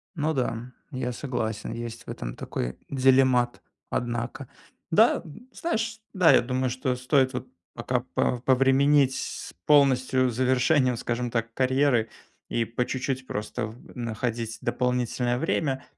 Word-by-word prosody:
Ну 155 0 0
да, 125 -2 -2 0.2
я 130 -2 -2
согласен, 115 -4 -3
есть 115 -1 -6
в - - -11
этом - - -5
такой 60 +1 -4
делемат, 130 -2 +3 0.3
однако. 120 +3 -3 0.4
Да, 220 +7 +4 0.3
знаешь, 225 -10 -2
да, 185 -5 +6
я - - +6
думаю 130 +1 -1
что 130 +1 -1
стоит 130 +1 +2
вот 125 +1 -4 0.3
пока 125 +1 -1
по 125 - +1
повременить 135 +2 +4
с - - -5
полностью 130 -3 +4
завершением, 130 +2 +2
скажем 120 +1 -2
так, 115 -1 -2
карьеры 130 -3 +2 0.4
и 115 - +1
по 120 +2 -2
чуть-чуть 130 0 -3
просто 110 +2 -3
в 115 +3 -13
находить 115 -1 -3
дополнительное 125 -1 0
время, 140 -2 -1
125 Hz, 130 wpm, -26 LUFS, 120-135 Hz, 0.4 s, да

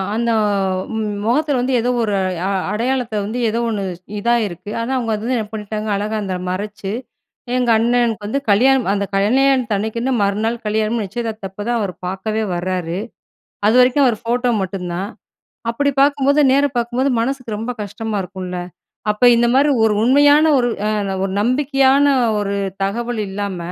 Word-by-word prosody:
அந்த 235 +1 0 0.9
முகத்தில 280 +3 +1
வந்து 260 +1 -1
ஏதோ 240 +2 0
ஒரு 210 -2 -1 0.3
அ - - 0 0.2
அடையாளத்த 240 +1 -1
வந்து, 220 +5 -3
ஏதோ 230 - -1
ஒண்ணு 210 -3 -2 0.4
இதாயிருக்கு. 210 -4 -1
ஆனா 230 +3 -3
அவுங்க 230 -3 -1
அது 210 - -6
வந்து 250 +1 0
என்ன 215 - -3
பண்ணிட்டாங்க. 215 0 -4
அழகா 210 +2 -2
அத 185 -2 -3
மறைச்சு, 205 +1 -4 0.6
எங்க 250 -1 +1
அண்ணனுக்கு 230 -2 +1
வந்து 275 +7 -1
கல்யாணம். 255 +3 +4
அந்த 200 0 -1
கல்யாணத்தன்னைக்குன்னு, 230 +1 +1
மறுநாள் 220 +4 -1
கல்யாணம். 215 +1 0
நிச்சயதார்த்தப்பதான் 215 +1 -4
அவர் 200 -4 -2
பார்க்கவே 215 +4 -2
வரார். 175 -1 -2 0.7
அதுவரைக்கும் 250 +4 +5
அவர் 225 -4 0
ஃபோட்டோ 245 +1 +1
மட்டும்தான். 185 0 -4 0.6
அப்டி 285 +5 +1
பாக்கும்போது, 285 0 +3
நேர 280 +1 +4
பார்க்கும்போது 240 +3 0
மனசுக்கு 245 -2 -2
ரொம்ப 230 +3 -3
கஷ்டமா 210 +2 -4
இருக்கும்ல. 185 -1 -6 0.5
அப்ப, 210 +4 0
இந்த 240 - +3
மாரி 285 +3 +4
ஒரு 220 -1 +3
உண்மையான, 290 +5 +5
ஒரு 245 -1 +2 0.6
ஒரு 195 - -2
நம்பிக்கையான 270 +3 +3 0.3
ஒரு 200 -1 -2 0.3
தகவல் 235 +3 -2
இல்லாம 200 -1 -4
225 Hz, 140 wpm, -19 LUFS, 205-250 Hz, 0.9 s, அதுவரைக்கும்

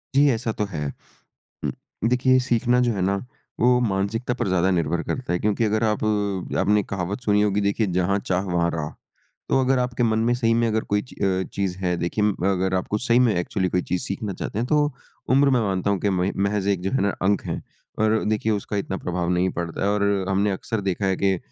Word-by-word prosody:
जी, 145 +1 +6
ऐसा 115 - -2
तो - - +2
है। 75 -1 -2 0.8
उम, - - 0 0.4
देखिए, 130 +1 +4
सीखना 120 +1 +3
जो - - +2
है - - -2
ना, 100 - +1 0.4
वो 120 - +5 0.2
मानसिकता 100 +6 -1
पर - - +1
ज़्यादा 95 +1 +3
निर्भर 85 +1 0
करता 130 -7 -2
है, 90 - +1
क्योंकि 105 +2 +2
अगर 110 +1 +1
आप 105 - -2 0.6
आपने 105 0 +3
एक - - -7
कहावत 95 +3 -3
सुनी 105 0 +4
होगी, 105 -1 +1
देखिए, 105 +1 0
जहाँ 100 +3 +1
चाह, 95 +1 +2
वहाँ 85 0 +2
राह। 75 -1 -3 0.6
तो - - +3
अगर 130 0 +2
आपके 125 -1 -1
मन 110 - +1
में, 120 - +3
सही 115 -2 +2
में 115 - +2
अगर 110 0 0
कोई 105 - +3
ची - - -13
अ, 95 -1 +1
चीज़ 95 -2 -2
है, 90 -1 +1
देखिए, 105 +4 -1
म 105 - 0 0.2
अगर 95 0 0
आपको 105 +3 -2
सही 120 +1 +5
में 110 - +2
एक्चुअली 90 +2 -1
कोई 90 - +3
चीज़ 90 -1 +1
सीखना 100 +1 -3
चाहते 105 - -3
हैं, 120 - 0
तो 150 -1 +5 0.5
उम्र, 140 0 +5
मैं 120 - +2
मानता 95 0 0
हूँ 100 - 0
कि - - +4
महि 90 +2 +1 0.2
महज़ 100 -1 -1
एक 90 - -10
जो - - -1
है - - +1
ना, 100 - +2 0.2
अंक 100 - +2
है - - -3 0.4
और 110 0 +3
देखिए, 110 +1 0
उसका 105 - -4
इतना 95 - -3
प्रभाव 90 -1 -1
नहीं 95 +1 +2
पड़ता 85 +3 -2
और 105 0 +1 0.3
हमने 100 +2 +2
अक्सर 110 -2 -3
देखा 95 +2 -2
है 95 - +2
कि 95 -2 +3
100 Hz, 230 wpm, -23 LUFS, 95-115 Hz, 0.8 s, जी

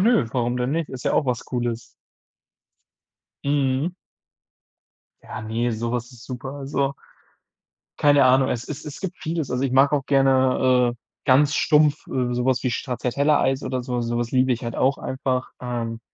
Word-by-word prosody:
nö, 220 - +4
warum 120 -1 0
denn 125 +1 -1
nicht? 165 -1 -1
Ist 130 -2 -8
ja - - +1
auch 145 - +2
was 125 -2 -1
Cooles. 120 -2 -4 1.5
Mhm. 140 +3 +1 1.3
Ja, - - -7
ne, 115 +2 -1
so 115 +1 -3
was 120 -1 -3
ist 120 -1 -14
super. 130 +1 -6
Also 140 0 -2 1.0
keine 145 -1 +5
Ahnung, 130 +1 +4
es 120 -1 -3
es 150 0 -6
es 150 -1 -8
gibt 190 -2 -5
vieles. 160 -3 -3
Also, 125 +1 0
ich 130 - -1
mag 135 +2 +5
auch 140 -2 0
gerne, 130 -2 +3
äh, - - -23 0.3
ganz 145 +2 +4
stumpf, 150 -1 +3
äh, 125 -2 -1
sowas 125 +1 +1
wie 125 - 0
Stracciatella-Eis 135 +3 0
oder 130 -1 -2
so. 125 0 -2
Sowas 120 0 -2
liebe 130 0 +3
ich 120 - -3
halt 115 - -4
auch 135 +1 +2
einfach. 130 -1 -2
Ähm, 115 -2 -4
130 Hz, 165 wpm, -23 LUFS, 120-140 Hz, 1.5 s, keine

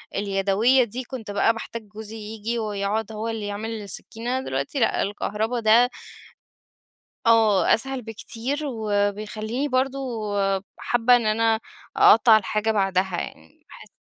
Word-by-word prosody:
اليدوية 200 +6 +2
دي 240 +3 -5
كنت 235 -5 -7
بقى 205 +3 +3
باحتاج 230 0 -7
جوزي 215 +1 -9
ييجي 220 +2 -4
ويقعد 210 0 -2
هو 220 +1 -4
اللي 220 -2 -4
يعمل 205 +2 -4
السكينة، 235 +5 -4
دلوقتي 140 - -3
لأ 230 - +2
الكهربا 210 +4 -2
ده 230 +3 +5 1.4
آه، 220 -5 +4
أسهل 265 +2 -1
بكتير 230 +4 -5
وبيخليني 215 +1 -2
برضو 265 0 0 0.8
حابة 240 +1 +3
إن 240 -2 0
أنا 225 +1 +2 0.4
أقطّع 235 - +7
الحاجة 215 +1 -1
بعدها، 190 -3 0
يعني 80 +1 -11
باحس - - -14
220 Hz, 125 wpm, -24 LUFS, 205-235 Hz, 1.4 s, أقطّع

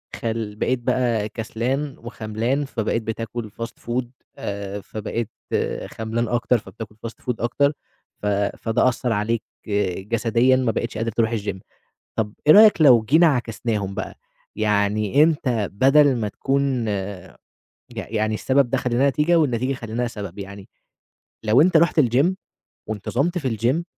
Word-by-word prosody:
خل 110 -2 -3
بقيت 130 +4 0
بقى 120 -3 0
كسلان 125 +6 -3
وخملان، 115 +4 -2
فبقيت 115 -3 -2
بتاكل 110 0 -5
Fast 115 +2 -8
food 120 +2 -1 0.3
آآ 100 0 -5
فبقيت 110 +2 -4 0.6
خملان 115 +1 -3
أكتر، 120 +2 +2
فبتاكل 110 0 -10
Fast 115 - -12
food 125 - -1
أكتر، 140 +5 +1 0.5
ف - - -6 0.3
فده 115 +2 +1
أثّر 125 0 -2
عليك 110 +2 -1 0.6
جسديًا، 115 +3 +3
ما 130 -3 +1
بقيتش 115 0 -3
قادر 115 +1 -1
تروح 115 0 +1
الGym 100 -2 -4 0.6
طب 105 -2 -1
إيه 155 - +9
رأيك 210 -2 +7
لو 125 -7 +7
جينا 160 +10 +5
عكسناهم 115 - -1
بقى؟ - - -6 0.4
يعني 105 +3 +2
أنت 130 - +1
بدل 135 +5 +5
ما 110 -3 -1
تكون 135 0 0 1.1
يع - - -5
يعني 110 -1 0
السبب 130 +3 +2
ده - - +1
خلّيناه 125 +2 +1
نتيجة، 150 +5 +2
والنتيجة 130 -3 +1
خلّيناها 120 -1 -3
سبب، 100 -4 -7
يعني 100 0 -9 0.7
لو 110 +5 +5
أنت 170 +1 +5
رُحت 170 0 +3
الGym 130 +3 +4 0.6
وانتظمت 130 - -1
في 130 -9 -2
الGym 130 +10 +1
115 Hz, 140 wpm, -22 LUFS, 110-130 Hz, 1.1 s, إيه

